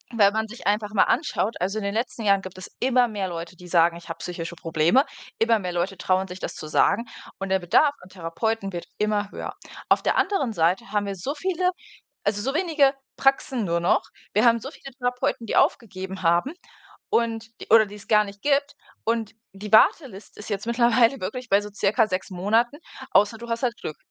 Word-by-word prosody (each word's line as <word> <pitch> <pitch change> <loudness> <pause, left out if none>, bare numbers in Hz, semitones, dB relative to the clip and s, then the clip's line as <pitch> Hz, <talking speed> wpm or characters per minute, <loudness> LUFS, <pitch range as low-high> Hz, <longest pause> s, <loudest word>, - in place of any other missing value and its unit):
wenn 205 -2 +5
man 220 0 -1
sich 235 -2 -8
einfach 210 0 0
mal 200 - +5
anschaut 230 - 0
also 195 +4 -1
in - - -6
den 200 +1 -2
letzten 230 0 -2
Jahren 200 -1 +3
gibt 185 0 -9
es 185 - -9
immer 250 -1 +3
mehr 205 -4 -3
Leute, 170 0 -6
die 180 - -12
sagen: 170 -1 +3
„Ich 170 - -14
habe 165 - -5
psychische 170 -1 -6
Probleme“, 165 - +2 0.4
immer 225 0 +4
mehr 180 -3 -4
Leute 180 +3 -2
trauen 185 +2 +1
sich, 180 0 -9
das - - -5
zu 155 - -8
sagen. 200 +8 +2 0.3
Und 195 0 -4
der 190 - +2
Bedarf 280 - +3
an 180 - -15
Therapeuten 195 +4 -3
wird 175 -2 -6
immer 210 -1 0
höher. - - -6 0.3
Auf - - +4
der - - +1
anderen 280 - +1
Seite 175 +3 +1
haben 205 -1 0
wir 200 - -3
so 195 +10 -4
viele 365 +2 0 0.6
also 205 0 +1
so 270 +5 -2
wenige 315 -6 +3 0.2
Praxen 270 -4 +1
nur 170 -1 0
noch. 170 +3 +2 0.3
Wir 215 +3 +3
haben 235 -1 +5
so 270 +5 -8
viele 275 - -11
Therapeuten, 245 -2 -1
die - - -2
aufgegeben 190 -3 0
haben 170 - +2 0.6
und 225 -1 0 0.2
oder 220 0 +7
die's 205 +1 -12
gar 210 -1 +5
nicht 200 0 -11
gibt. 285 0 +1 0.3
Und 225 -1 -1 0.2
die 205 +2 -8
Warteliste 220 - +3
ist 210 - -9
jetzt 205 +1 -3
mittlerweile 235 +2 +3
wirklich 245 +7 -5
bei 200 - +5
so 210 - -8
circa 215 +2 +2
6 185 -1 -3
Monaten, 220 +8 +1 0.4
außer 210 +2 +3
du 235 +1 -9
hast 230 +1 -2
halt 240 -2 0
Glück. 155 - -5
210 Hz, 205 wpm, -24 LUFS, 185-235 Hz, 0.6 s, oder